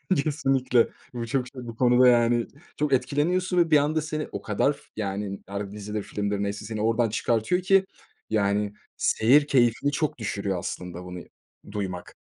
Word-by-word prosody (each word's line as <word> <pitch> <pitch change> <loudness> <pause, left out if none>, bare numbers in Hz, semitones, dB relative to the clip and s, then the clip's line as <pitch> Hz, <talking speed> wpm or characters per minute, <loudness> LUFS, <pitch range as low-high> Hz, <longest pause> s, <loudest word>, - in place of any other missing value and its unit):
Kesinlikle. 135 -5 +2 0.2
Bu 120 -1 -4
çok 125 +1 -1
şey, 125 -1 -9
bu 115 - -7
konuda 125 +1 +5
yani 120 -1 +4 0.3
çok 150 -2 0
etkileniyorsun 170 +8 +1
ve 165 -2 +3
bir 150 - +8
anda 150 +2 +1
seni 155 0 -3
o - - -5
kadar, 140 +7 +1 0.2
yani, 100 -1 -3
ar 100 0 -5
Dizidir, 105 0 -5
filmdir 100 0 -2
neyse 100 +1 -4
seni 110 -1 -4
oradan 115 +1 +2
çıkartıyor 115 - 0
ki, 195 +1 +4 0.4
yani, 105 -1 +1 0.2
seyir 140 +7 +4
keyfini 125 +2 +3
çok 155 -1 -1
düşürüyor 100 -4 -2
aslında 90 0 -6
bunu 90 0 -7 0.5
duymak. 95 -3 -5
115 Hz, 155 wpm, -26 LUFS, 105-145 Hz, 0.5 s, bir